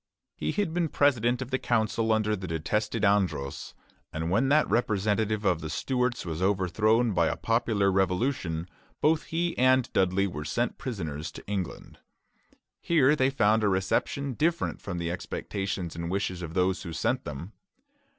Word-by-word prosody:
He - - -2
had 200 -6 -1
been 170 -2 0
president 125 -4 +2
of 130 - -12
the 130 - +1
council 110 -1 +1
under 110 -1 +2
the 95 -2 -6
detested 105 +7 -1
Andros, 95 -9 0 0.4
and 80 +1 -3
when 115 +8 +2
that 150 +1 +4
representative 110 -1 0
of 90 -4 +2
the 80 - -5
Stuarts 125 - -1
was 80 0 -4
overthrown 105 +4 +2
by 85 -2 +3
a - - -1
popular 110 -4 +1
revolution, 90 -3 0 0.3
both 155 +1 +2
he 170 +1 -1
and 130 0 +3
Dudley 95 +1 +2
were 80 -6 -4
sent 120 +11 -2
prisoners 80 - -4
to - - -10
England. 95 -3 -5 0.8
Here 150 -4 +4
they 130 -2 +3
found 110 -5 +2
a - - +3
reception 100 +8 0
different 165 +6 0
from 95 -3 -5
the 85 0 -2
expectations 90 -1 -4
and 85 0 -4
wishes 95 -1 -2
of 85 0 -6
those 95 0 +1
who 85 - -6
sent 80 - 0
them. 75 +9 -7
105 Hz, 160 wpm, -28 LUFS, 90-125 Hz, 0.8 s, that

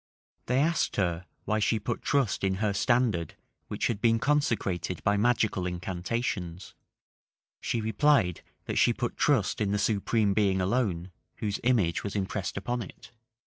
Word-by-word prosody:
They 125 - +1
asked 165 +3 +1
her, 90 -2 -1 0.2
why 110 +1 +1
she 110 +2 +2
put 115 +3 -3
trust 135 -10 0
in 95 -1 +1
her 105 +1 0
standard, 110 - +1 0.3
which - - -2
had 110 -3 -1
been 115 -1 +4
consecrated 115 - 0
by 100 - +3
magical 110 -4 +1
incantations: 90 0 -3 0.9
she 115 - -2
replied 110 - +2 0.2
that - - -1
she - - +4
put - - -3
trust - - +1
in 105 - +1
the - - +2
Supreme 105 0 +1
Being 95 -2 +2
alone, 95 -3 0 0.2
whose 105 -2 -3
image 110 -10 +2
was 100 - -4
impressed 95 -1 -2
upon 120 +5 -2
it. 120 +1 -11
105 Hz, 150 wpm, -28 LUFS, 95-120 Hz, 0.9 s, been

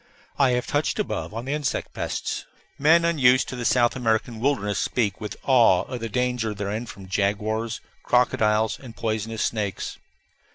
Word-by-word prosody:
I 135 -2 +5
have 125 0 0
touched 145 +1 0
above 210 - -2
on 115 +3 -5
the 135 - -2
insect 150 -4 -2
pests. - - -3 0.3
Men 165 +4 +5
unused 130 -6 +4
to - - -5
the 120 -1 -4
South 120 -1 +3
American 115 -2 0
wilderness 110 -6 0
speak 105 -6 -1
with 105 - -5
awe 120 -9 +5
of 125 -2 -6
the 115 0 -4
danger 125 -2 -1
therein 105 +4 -3
from 100 -3 -10
jaguars, 105 +4 -1 0.2
crocodiles, 110 -3 +2
and 120 -4 -11
poisonous 110 0 -2
snakes. 105 -4 -3
115 Hz, 160 wpm, -24 LUFS, 105-125 Hz, 0.3 s, I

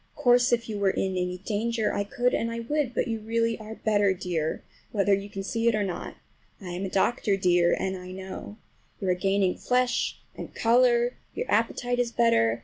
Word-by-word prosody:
Of - - -10
course 245 0 +5
if 235 -1 +1
you 210 -2 -4
were 200 -1 +3
in 190 0 -1
any 180 -1 -2
danger 225 +1 0
I 200 - 0
could 245 +4 0
and 230 - 0 0.2
would, 295 -5 0
but - - 0
you 225 -1 -2
really 230 +1 0
are 215 0 -8
better, 205 -3 +2
dear, 165 -3 -2 0.3
whether 200 -1 +2
you 200 +1 -1
can 195 -1 -5
see 230 +3 -1
it 230 - +4
or 210 - +1
not. 190 -3 -5 0.4
I 185 - -8
am 180 +3 -3
a - - -3
doctor, 200 +1 +1
dear, 175 -2 +3
and 190 0 -1
I 180 0 -8
know. 190 +2 -8 0.4
You 195 - -2
are - - +4
gaining 195 0 +1
flesh 250 -1 +1 0.2
and - - -8
color, 240 +1 +3 0.2
your 480 - -2
appetite 245 0 +1
is 240 -1 +1
better. 120 - +3
210 Hz, 205 wpm, -27 LUFS, 190-235 Hz, 0.4 s, course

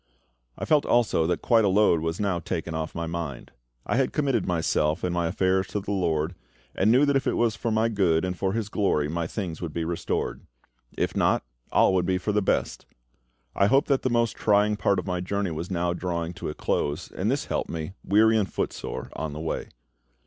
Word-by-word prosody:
I - - -4
felt 150 -2 +4
also 110 -9 +3
that 90 - -1
quite 115 -2 +4
a - - +3
load 95 -4 +4
was 80 +1 -2
now 100 -4 0
taken 85 0 -4
off 80 0 -4
my 85 - -2
mind. 80 -6 -5 0.3
I - - 0
had 135 -1 +1
committed 140 -4 0
myself 80 -2 +1
and 90 - 0
my 85 -1 0
affairs 95 +2 +1
to 100 +3 -3
the 100 +1 -5
LORD, 85 -4 0 0.4
and 100 +4 +3
knew 130 +5 +5
that 140 -1 +2
if 135 - +1
it - - +1
was 115 -2 +2
for 115 - -2
my 110 +1 +2
good 95 -7 +2
and 90 0 -2
for 95 +1 -1
His 110 -2 -2
glory 95 -8 +1
my 85 +1 -2
things 90 -4 -5
would 85 -4 -4
be 85 -1 -1
restored; 85 0 -2 0.6
if - - -1
not, - - +2 0.3
all - - +4
would 90 -2 +1
be 95 -1 +2
for 100 +3 -2
the 105 0 +2
best. 95 - -1 0.7
I 100 - +4
hoped 135 +6 +3
that 135 -2 +3
the 130 - 0
most 115 -2 +1
trying 105 0 +3
part 100 -1 +1
of 90 - -2
my 90 -1 -2
journey 100 0 -2
was 80 +3 -5
now 85 -1 0
drawing 85 -1 -3
to 90 - -5
a 75 - -6
close, 75 +4 -2
and 100 +4 -2
this 135 +3 0
helped - - -2
me, 80 +2 -5
weary 110 +2 +4
and 100 - -1
footsore, - - -4
on 80 -2 -4
the 75 - -6
way. 80 0 -3
95 Hz, 220 wpm, -26 LUFS, 85-105 Hz, 0.7 s, knew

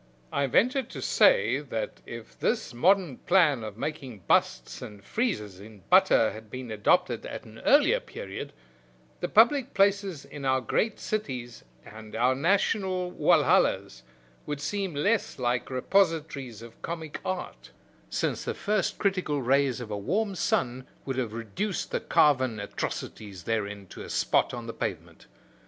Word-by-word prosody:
I 140 - +1
venture 250 - +3
to 240 - -9
say - - +4
that - - -5
if - - -10
this 230 - -1
modern 175 +1 +3
plan 160 -10 +3
of 105 -1 -7
making 135 -6 -5
busts - - +1
and 105 -2 -9
friezes 105 - -2
in 105 0 -13
butter 110 - +5
had 110 0 -11
been 125 -1 -7
adopted 105 -2 +2
at - - -7
an - - -13
earlier - - +4
period, - - -7 0.7
the 175 - -2
public 255 +4 +4
places 195 -5 +2
in 145 - -9
our 130 -1 +2
great 205 - -1
cities 130 - -4 0.2
and 110 0 -11
our 125 +3 +3
national 185 +4 +1
Walhallas - - +2 0.5
would 145 -1 -3
seem 190 +3 -3
less 205 +9 0
like 125 -1 -1
repositories 140 - 0
of 115 -1 -14
comic 160 -3 -5
art, 185 -1 -5 0.4
since - - -1
the - - -3
first 210 -3 0
critical 185 -8 0
rays 135 0 +2
of 115 -3 -7
a 105 - -2
warm 200 - -1
sun 130 -6 -1 0.2
would 135 -1 -3
have 120 -4 -1
reduced 115 - -3
the - - 0
carven 130 -6 +3
atrocities 100 -1 -5
therein 105 -2 -2
to - - -10
a - - -8
spot - - +2
on 120 -1 -6
the 115 - -6
pavement. - - -5
140 Hz, 150 wpm, -27 LUFS, 115-190 Hz, 0.7 s, butter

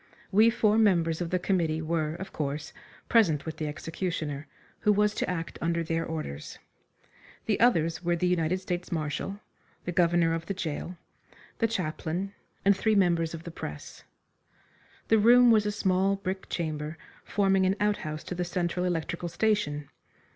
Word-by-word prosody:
We 215 +4 +6
four 220 -1 +3
members 170 -6 +3
of 170 - -2
the 185 - +1
committee 170 -4 0
were, 160 -1 -1
of 190 +2 -8
course, 150 0 -3 0.3
present 170 -11 +3
with 160 - -5
the 155 - -2
executioner, 155 -1 -4 0.3
who 210 - +3
was 210 0 +3
to - - -2
act 165 -2 -4
under 170 0 0
their 165 0 -1
orders. 155 - -5 0.9
The 210 - +1
others 170 -8 +3
were 175 0 +2
the 170 - -1
United 180 0 +1
States 180 -1 -4
Marshal, 165 +5 -3 0.4
the 175 - -2
governor 170 -1 +3
of 165 0 -3
the 195 - -2
gaol, 175 0 -4 0.6
the 230 - +3
chaplain, 180 -1 -3 0.3
and 200 0 +6
three 215 +3 +2
members 170 -4 +2
of 165 - -9
the 170 - -7
press. 75 - -8 1.1
The 220 - +5
room 240 +2 +7
was 215 -2 +4
a - - +1
small 195 -1 +2
brick 190 -1 -5
chamber, 155 -1 -3 0.3
forming 195 -2 +2
an 190 - +2
outhouse 155 -7 -1
to - - -5
the 180 0 -2
Central 180 0 -1
Electrical 170 0 -2
station. 170 -7 0
175 Hz, 160 wpm, -28 LUFS, 160-195 Hz, 1.1 s, room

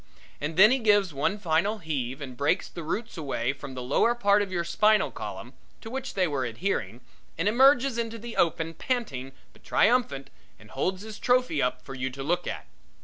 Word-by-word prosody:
And 155 +3 -4
then 210 +4 +8
he 265 - +2
gives 205 -6 +3
one 150 +9 0
final 195 +3 +1
heave 140 - -4
and 130 -3 -7
breaks 145 +8 +1
the 170 - -8
roots 210 +7 -4
away 135 -4 -1
from 140 -1 -9
the 125 - -5
lower 185 - +2
part 205 -3 +3
of 200 -2 -3
your 175 -2 -1
spinal 215 +5 +3
column - - -7 0.3
to 225 - -9
which 265 0 -5
they 185 -2 +2
were 140 -4 -1
adhering, 120 - -3 0.4
and 165 +5 0
emerges 260 +2 +4
into 230 0 -3
the 235 +1 -8
open 165 -1 +1
panting 155 - -3 0.2
but - - -22
triumphant, 210 - +1 0.3
and 105 0 -17
holds 185 +8 -2
his 220 -1 -9
trophy 245 - +2
up 125 0 -1
for 135 - -9
you 130 0 -3
to 135 +1 -7
look 175 +5 -1
at. - - -5
175 Hz, 200 wpm, -27 LUFS, 135-220 Hz, 0.4 s, then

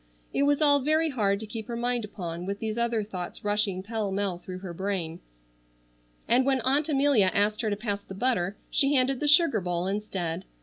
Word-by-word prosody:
It 280 - +2
was 290 +1 +2
all 285 -1 +5
very 310 +3 +2
hard 200 -6 +1
to - - -5
keep 220 +1 -7
her 235 - -4
mind 240 0 -1
upon, 180 -4 -6
with 200 0 -2
these 215 0 -3
other 235 -2 0
thoughts 185 -4 -7
rushing 205 -2 0
pell 215 -1 -3
mell 195 -2 -1
through 185 0 -8
her 175 - -5
brain; 180 -3 -3 1.1
and 250 +2 +4
when 265 0 +2
Aunt 280 +5 +2
Amelia 275 -9 +4
asked 210 +1 +1
her 220 - -1
to 205 - 0
pass 205 -1 -3
the 190 - -10
butter, 205 -4 0
she 280 +1 +3
handed 260 0 +2
the 295 - -1
sugar 295 - +5
bowl 175 0 -2
instead. 190 -3 -3
215 Hz, 205 wpm, -27 LUFS, 190-260 Hz, 1.1 s, all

